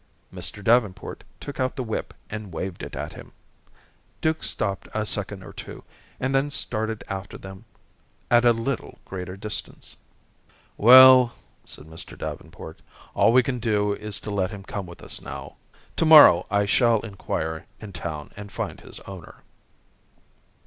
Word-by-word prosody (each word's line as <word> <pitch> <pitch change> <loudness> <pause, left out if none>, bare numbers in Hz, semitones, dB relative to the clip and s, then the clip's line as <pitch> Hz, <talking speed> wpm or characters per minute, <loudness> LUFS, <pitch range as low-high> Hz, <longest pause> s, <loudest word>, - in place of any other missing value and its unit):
Mr. 105 - -5
Davenport 110 -3 +1 0.2
took 145 - -8
out 130 0 0
the 130 - -3
whip 110 -2 -4 0.2
and 105 -3 -7
waved 85 +2 -5
it - - -7
at - - -5
him. - - -12 0.9
Duke 160 0 0
stopped 100 -2 -2
a 110 0 0
second 100 -2 -3
or - - -11
two, - - -9 0.4
and 130 +1 -1
then 135 +2 +2
started 110 -5 -2
after 95 +1 -6
them 95 0 -11 0.7
at 120 0 +6
a 120 - +6
little 115 +3 -3
greater 90 0 -6
distance. 105 +2 -7 0.8
"Well," 130 +1 +9 0.3
said - - -7
Mr. 80 +1 -10
Davenport, 80 -1 -8 0.3
"all - - +4
we 125 +1 +5
can 125 0 -2
do 105 -3 +1
is 105 -1 -3
to 105 - -6
let 95 -2 0
him 100 0 -9
come 100 -1 -5
with 85 - -12
us - - -3
now. - - -8 0.4
To - - +2
morrow, 155 - +9
I 100 0 +2
shall 115 +1 +3
inquire 85 -5 -4
in 105 -3 -9
town 80 -2 -6
and 100 0 -9
find - - -4
his - - -9
owner." 95 -5 -11
105 Hz, 155 wpm, -25 LUFS, 95-120 Hz, 0.9 s, Well